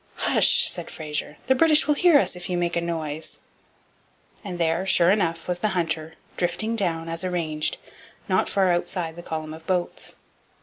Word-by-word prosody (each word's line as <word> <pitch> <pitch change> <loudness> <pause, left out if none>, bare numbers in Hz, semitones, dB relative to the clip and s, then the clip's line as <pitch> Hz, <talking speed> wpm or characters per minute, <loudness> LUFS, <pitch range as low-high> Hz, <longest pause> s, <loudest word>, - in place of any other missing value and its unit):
'Hush!' - - +4
said - - -3
Fraser, 150 -1 -5
'the 260 - +4
British 305 +3 +4
will 295 - +3
hear 330 +1 +5
us 270 - +1
if 180 +1 -7
you 180 - 0
make 175 0 -1
a 170 - +1
noise.' 160 -2 -4 1.0
And 190 -4 -5
there, 165 +1 +1
sure 175 -1 +5
enough, 165 -5 0
was 180 -1 -1
the 210 -2 -1
Hunter, 160 -2 -2 0.2
drifting 215 +6 -1
down, 165 -6 -1
as 165 +2 -2
arranged, 165 -4 -1 0.5
not - - +1
far 190 -2 +2
outside 175 -1 -2
the 175 - -8
column 155 -2 -5
of 160 +1 -12
boats. 180 -2 -2
175 Hz, 175 wpm, -24 LUFS, 160-185 Hz, 1.0 s, hear